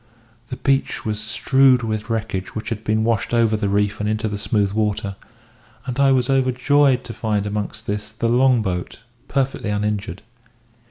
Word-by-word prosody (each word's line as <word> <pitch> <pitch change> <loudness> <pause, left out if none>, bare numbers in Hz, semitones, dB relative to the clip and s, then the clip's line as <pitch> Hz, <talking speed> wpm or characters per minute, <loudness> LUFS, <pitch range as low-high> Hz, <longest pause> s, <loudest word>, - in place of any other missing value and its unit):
The 130 - -5
beach 135 0 0
was 105 -1 -1
strewed 125 +4 +3
with 110 0 -3
wreckage 110 -4 -3
which 110 - -4
had 110 -2 -4
been 110 0 +1
washed 115 +1 0
over 115 -2 +3
the 105 -2 -1
reef 105 0 0
and 105 0 -1
into 110 0 -1
the 105 -1 -4
smooth 100 -2 0
water; 105 -1 -1 0.7
and 125 0 -4
I 140 -1 +5
was 130 -2 +2
overjoyed 135 0 +3
to 115 - -8
find 105 -3 -1
amongst 105 0 -4
this 105 +1 -4
the 110 +2 -2
long 125 0 +3
boat, 90 0 -4 0.3
perfectly 135 -5 -1
uninjured. 105 -3 -2
110 Hz, 170 wpm, -21 LUFS, 105-125 Hz, 0.7 s, I